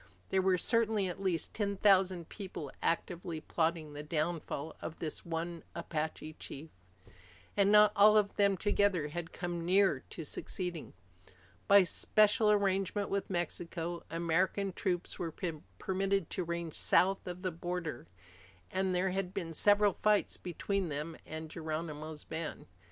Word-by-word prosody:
There 190 - +3
were 185 -1 +3
certainly 220 0 +2
at 180 - -6
least 180 -4 -1
ten 200 -2 -1
thousand 185 -4 +4
people 185 -8 -7
actively 170 -1 -1
plotting 160 -1 -1
the 145 - -5
downfall 155 -1 -2
of 160 - -6
this 155 - -3
one 170 0 -3
Apache 155 -1 -4
chief. 155 +3 -8 0.8
And 200 0 +4
not 210 0 +7
all 210 +1 +7
of 205 -1 +2
them 200 -1 +3
together 200 -5 +2
had 170 +2 -5
come 175 -1 -4
near 185 -3 +4
to 165 - -6
succeeding. 175 +2 -4 0.7
By 200 -1 +8
special 215 +4 +3
arrangement 200 0 +1
with 200 0 -1
Mexico, 175 -1 -3
American 180 +4 0
troops 180 -2 -2
were 165 -3 -3 0.4
permitted 195 - 0
to 185 - -1
range 170 -1 -3
south 195 +1 +2
of 180 +1 -6
the 185 - 0
border, 170 - -4 0.6
and 190 -1 +1
there 185 +1 +1
had 190 -1 -3
been 170 -4 -3
several 205 +3 +4
fights 210 -1 +3
between 185 +1 -2
them 150 +3 -4
and 160 +1 -5
Geronimo's 155 -1 -5
band. 160 0 -5
180 Hz, 140 wpm, -33 LUFS, 165-195 Hz, 0.8 s, By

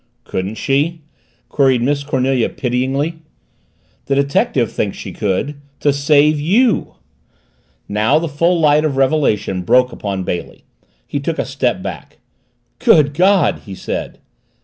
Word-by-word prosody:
"Couldn't 95 +3 -4
she?" 150 +7 -1 0.4
queried 130 -4 +2
Miss 140 +2 0
Cornelia 130 -3 0
pityingly. 135 +6 -2 0.9
"The 140 - +1
detective 140 -3 +1
thinks 100 - -2
she - - -7
could 105 +8 -2 0.2
to 145 - +2
save 145 +1 +3
you!" 215 - +1 0.9
Now 110 +8 +2
the 165 +1 -1
full 170 +4 +1
light 150 -1 +4
of 145 -4 -1
revelation 130 -9 +1
broke 125 +8 +3
upon 100 -4 -4
Bailey. 90 -1 -5 0.4
He - - -3
took - - -3
a - - -1
step - - -1
back. - - -8 0.6
"Good 145 -2 +4
God!" 185 +4 +3
he 95 - -7
said. - - -5
140 Hz, 130 wpm, -17 LUFS, 120-150 Hz, 0.9 s, light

